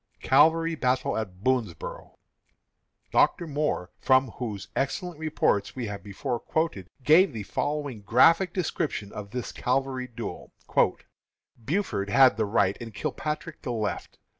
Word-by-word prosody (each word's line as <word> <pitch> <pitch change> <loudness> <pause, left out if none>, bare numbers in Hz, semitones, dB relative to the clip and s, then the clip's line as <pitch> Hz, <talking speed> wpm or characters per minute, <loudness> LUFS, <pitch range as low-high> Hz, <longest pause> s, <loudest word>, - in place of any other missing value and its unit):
CAVALRY 165 +5 +4
BATTLE 130 -4 0
AT 95 -4 -5
BOONSBORO'. 120 -11 -2 0.9
Dr. 170 - +3
Moore, 150 - -2
from 130 -1 +3
whose 110 -7 -5
excellent 160 +4 -2
reports 150 -10 0
we 125 -2 -3
have 100 -2 -5
before 115 +5 -4
quoted, 155 - -2 0.2
gives 160 +5 +5
the 110 -2 -5
following 145 +1 -3
graphic 165 - +5
description 145 - -2
of 100 -1 -7
this 125 +3 -4
cavalry 130 0 -1
duel: 120 -1 -7 1.1
"Buford 140 - -1
had 130 +1 +6
the 110 0 0
right 100 -2 +2
and 115 -3 -8
Kilpatrick 155 +3 -4
the 125 - -4
left. 110 -3 -3
130 Hz, 130 wpm, -27 LUFS, 105-150 Hz, 1.1 s, had